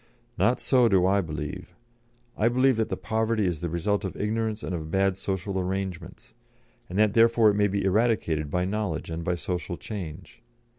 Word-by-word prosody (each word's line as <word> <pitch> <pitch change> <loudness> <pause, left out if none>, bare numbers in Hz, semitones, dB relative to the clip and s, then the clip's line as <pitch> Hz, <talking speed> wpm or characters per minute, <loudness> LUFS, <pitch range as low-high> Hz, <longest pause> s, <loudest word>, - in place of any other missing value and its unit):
Not 120 +2 +2
so 125 -3 +4
do 95 -4 +3
I 100 +1 +3
believe. 75 -4 -6 0.6
I 110 - +2
believe 130 0 +3
that 110 - 0
the - - -2
poverty 110 -1 0
is 85 -4 -1
the 85 - -2
result 100 +6 -1
of 95 - -5
ignorance 110 0 -2
and - - -3
of 80 -2 -4
bad 95 +2 +2
social 95 0 -3
arrangements, 95 -1 -5 0.6
and 90 - -4
that 105 -1 +4
therefore 115 -1 +5
it - - -2
may 105 0 +3
be 100 0 -1
eradicated 95 -8 +1
by 90 +4 0
knowledge 95 -5 -3
and 80 +1 -4
by 90 +1 0
social 90 0 -4
change. 90 -1 -8
95 Hz, 185 wpm, -26 LUFS, 90-110 Hz, 0.6 s, therefore